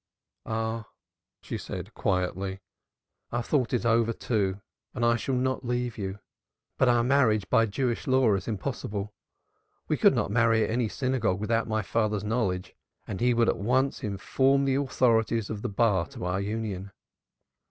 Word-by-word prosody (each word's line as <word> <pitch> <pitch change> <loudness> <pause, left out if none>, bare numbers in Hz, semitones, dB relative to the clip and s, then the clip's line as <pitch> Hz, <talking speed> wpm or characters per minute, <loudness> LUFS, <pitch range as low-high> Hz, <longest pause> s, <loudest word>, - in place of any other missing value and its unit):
"Ah!" 110 0 -2 0.6
she - - -4
said - - -7
quietly. 95 +1 -1 0.7
"I - - -4
have 120 -1 -1
thought 130 -5 +1
it 120 -2 0
all 115 - +4
over, 115 0 +2
too, 100 -5 -1 0.4
and 120 -1 0
I 120 0 +4
shall 130 +3 -1
not 130 +1 0
leave 120 -1 -2
you. 95 -1 -4 0.6
But 130 - +5
our 120 -1 +4
marriage 115 -7 +3
by 115 0 +4
Jewish 120 +3 -2
law 130 -4 +4
is 95 -2 -2
impossible; 105 -2 -4 0.7
we - - +1
could - - +5
not - - 0
marry 115 0 +3
at - - -1
any 120 0 +1
synagogue 125 -8 0
without 115 +2 0
my 110 -1 0
father's 105 0 0
knowledge; 105 -5 -1 0.3
and 95 -3 -5
he 120 0 +3
would 115 -1 +3
at - - +1
once 130 +6 +1
inform 130 +7 +1
the 135 - +2
authorities 115 -5 +1
of 105 -2 -4
the - - -2
bar 100 -5 +2
to - - -7
our 90 +2 -1
union." 100 -2 -3
115 Hz, 170 wpm, -27 LUFS, 100-125 Hz, 0.7 s, But